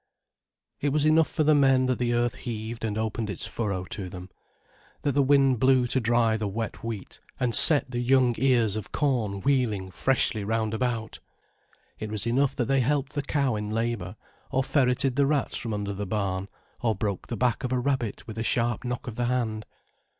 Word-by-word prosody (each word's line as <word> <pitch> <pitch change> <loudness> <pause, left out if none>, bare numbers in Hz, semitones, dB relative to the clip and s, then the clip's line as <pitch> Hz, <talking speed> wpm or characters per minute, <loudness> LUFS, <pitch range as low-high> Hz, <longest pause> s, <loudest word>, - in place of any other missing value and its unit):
It 145 - 0
was 150 +1 +1
enough 155 +1 +4
for 155 - 0
the 155 +1 +4
men, 135 -3 +4
that 130 -1 0
the 120 -1 0
earth 120 0 +1
heaved 115 0 -6
and 110 -2 -2
opened 110 0 -2
its 100 - -3
furrow 100 -5 -3
to 95 -3 -5
them, 90 +1 -9 0.7
that 145 - +1
the 140 +1 +2
wind 135 -2 +4
blew 130 0 +4
to 125 +2 0
dry 115 -1 +2
the 110 -1 -2
wet 110 +2 -5
wheat, 110 -4 -6 0.2
and 125 -2 0
set 145 -2 +6
the 120 - -2
young 125 0 +3
ears 120 -5 +3
of 110 - -6
corn 115 -9 0
wheeling 110 -9 0
freshly 115 -2 0
round 110 +1 -1
about; 115 -1 -2 0.8
it 110 - -5
was 105 0 -3
enough 135 +3 +1
that 125 - 0
they 135 +1 +2
helped 140 +3 0
the 145 - -1
cow 140 -4 0
in 105 0 -4
labour, 110 -3 -2 0.3
or 130 - +1
ferreted 130 -1 +1
the 140 -1 +4
rats 145 -2 0
from 115 -4 -3
under 100 -1 -3
the 100 0 -5
barn, 95 -2 -2 0.3
or 115 -3 +1
broke 100 -1 -3
the 115 - -4
back 125 -1 0
of 125 - -2
a 130 - +1
rabbit 125 -4 -2
with 110 0 -7
a - - -1
sharp 120 0 0
knock 125 +3 -4
of 120 -4 -7
the 120 - 0
hand. 115 -4 -2
120 Hz, 200 wpm, -26 LUFS, 110-130 Hz, 0.8 s, set